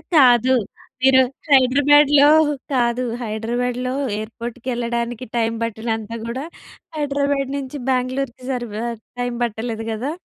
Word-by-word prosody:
కాదు. 255 -3 +6 0.5
మీరు 265 0 +6 0.3
హైదరాబాద్‌లో 285 +1 +5 0.5
కాదు, 245 -1 +1 0.2
హైదరాబాద్‌లో 240 +3 -2 0.2
ఎయిర్‌పోర్ట్‌కెళ్ళడానికి 235 +1 -4
టైమ్ 230 0 0
పట్టినంత 225 -1 -3 0.2
కూడా 260 +5 -4 0.5
హైదరాబాద్ 280 -2 0
నుంచి 275 +1 -6
బ్యాంగ్లూర్‌కి 255 0 -1
సరిగా 235 -3 -4 0.3
టైమ్ 245 0 -2
పట్టలేదు 225 0 -3
కదా! 235 +7 -3
245 Hz, 95 wpm, -21 LUFS, 235-265 Hz, 0.5 s, కాదు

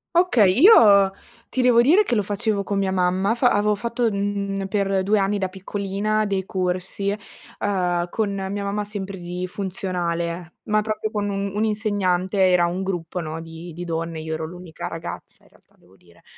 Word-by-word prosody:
Okay, 245 - +4
io 205 - +7 0.4
ti 260 - -1
devo 245 -2 +5
dire 345 - +5
che 245 - -1
lo 210 - +1
facevo 205 +1 -1
con 200 0 -1
mia 195 -1 0
mamma 190 +3 +1
fa 245 +1 +3
avevo 210 +1 +2
fatto, 235 +2 -1
mhmm, 200 -1 -2
per 195 -1 0
2 210 +2 +2
anni 200 +1 +1
da 190 -2 -1
piccolina 200 +2 -2
dei 195 -2 -1
corsi, 185 +2 -1 0.5
ehm, 180 -3 0
con 210 +1 -1
mia 195 +1 -3
mamma 200 +1 -2
sempre 200 -2 -6
di 180 +1 -4
funzionale, 175 -3 -3
ma 215 0 +1
proprio 215 0 -3
con 205 -1 -1
un 200 0 -2
un 210 +1 0
insegnante. 205 -3 0
Era 180 -2 +5
un 175 +2 -2
gruppo, 180 -2 -3
no, 160 -1 -5
di 165 +1 -9
di 175 +2 -7
donne, 165 -1 -3
io 160 0 -4
ero 160 0 -3
l'unica 175 -1 -8
ragazza 165 +1 -8
in - - -23
realtà - - -28
devo 90 +2 -24
dire, 85 -2 -23
195 Hz, 185 wpm, -23 LUFS, 180-210 Hz, 0.5 s, io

